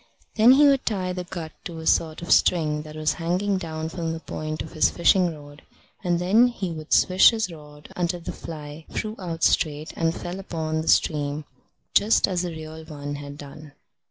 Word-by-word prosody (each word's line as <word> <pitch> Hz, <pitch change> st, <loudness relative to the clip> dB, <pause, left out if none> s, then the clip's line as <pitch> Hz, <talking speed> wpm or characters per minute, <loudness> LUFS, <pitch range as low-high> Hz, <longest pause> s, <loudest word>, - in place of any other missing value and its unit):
Then 230 Hz, +3 st, +7 dB
he 290 Hz, +2 st, +6 dB
would 275 Hz, -2 st, +4 dB
tie 185 Hz, -4 st, -1 dB
the 180 Hz, 0 st, -5 dB
gut 170 Hz, -3 st, -6 dB
to 170 Hz, -4 st, -6 dB
a 160 Hz, -, -7 dB
sort 160 Hz, 0 st, +1 dB
of 170 Hz, -, -4 dB
string 150 Hz, -4 st, +3 dB
that 155 Hz, 0 st, -10 dB
was 155 Hz, -1 st, 0 dB
hanging 185 Hz, +4 st, 0 dB
down 160 Hz, -2 st, -4 dB
from 165 Hz, -1 st, -3 dB
the 165 Hz, -, -5 dB
point 155 Hz, -1 st, -5 dB
of 160 Hz, -, -10 dB
his 155 Hz, -, +3 dB
fishing 170 Hz, -1 st, +2 dB
rod; 145 Hz, 0 st, -14 dB, 0.4 s
and 175 Hz, -1 st, +1 dB
then 200 Hz, +8 st, +4 dB
he 200 Hz, -7 st, -4 dB
would 155 Hz, -1 st, -8 dB
swish 185 Hz, +1 st, +6 dB
his 220 Hz, -6 st, -2 dB
rod 150 Hz, -2 st, -13 dB
until 175 Hz, 0 st, -1 dB
the -, -, -5 dB
fly 155 Hz, -1 st, -9 dB
flew 215 Hz, 0 st, -4 dB
out 165 Hz, -3 st, -5 dB
straight 155 Hz, 0 st, +1 dB
and 165 Hz, 0 st, 0 dB
fell 175 Hz, +2 st, -6 dB
upon 160 Hz, -4 st, -3 dB
the 160 Hz, -, -8 dB
stream, 150 Hz, -1 st, +1 dB, 0.5 s
just 215 Hz, +3 st, +4 dB
as 180 Hz, -3 st, -1 dB
the 180 Hz, -, -3 dB
real 160 Hz, -1 st, -8 dB
one 145 Hz, -2 st, -6 dB
had 145 Hz, 0 st, -9 dB
done. 145 Hz, 0 st, -11 dB
165 Hz, 200 wpm, -24 LUFS, 155-180 Hz, 0.5 s, Then